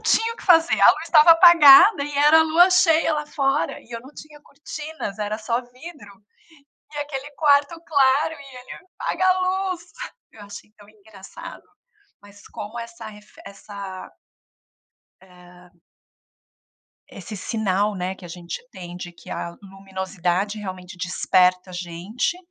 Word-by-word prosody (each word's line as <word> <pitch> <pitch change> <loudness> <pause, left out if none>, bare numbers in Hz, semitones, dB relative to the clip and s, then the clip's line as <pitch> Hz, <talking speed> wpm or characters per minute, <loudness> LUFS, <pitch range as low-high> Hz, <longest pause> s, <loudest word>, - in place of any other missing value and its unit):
tinha 455 +1 +1
o - - -15
que - - -13
fazer, 330 -3 +3
a - - +8
luz - - -8
estava 315 +1 +6
apagada, 330 0 +7
e 290 -1 -7
era 300 +3 +5
lua 340 +4 +4
cheia 330 -4 +3
lá 300 0 -4
fora, 280 -1 -2
e 240 - -23
eu 230 - -7
não 260 +3 -15
tinha 300 -1 -14
cortinas, 295 -6 -9
era 210 0 -3
só 230 +2 -2
vidro, 255 -2 -14 0.8
e 295 - -6
aquele 290 -1 -6
quarto 290 +2 +1
claro, 285 0 +1
e 275 -3 -14
ele: 250 +8 -13
"Apaga 375 - -1
a 370 0 +2
luz". 370 -1 -2 0.5
Eu 210 - -15
achei 205 +1 -12
tão 205 - -18
engraçado. 215 - -13 0.6
Mas 205 0 -18
como 215 +3 -9
essa 230 -1 -9
refe 210 0 -15
essa 200 -1 -10 1.1
eh 180 -1 -19 1.4
esse 205 +2 -10
sinal, 205 0 -2
né, 185 +1 -4
que 190 - -16
a - - -10
gente 170 0 -8
tem 175 -2 -10
de 175 -1 -9
que 170 -1 -16
a 170 0 -6
luminosidade, 195 0 -4
realmente, 185 -2 -9
desperta 180 0 +1
a - - -12
gente, 180 - -4
230 Hz, 150 wpm, -22 LUFS, 190-300 Hz, 1.4 s, a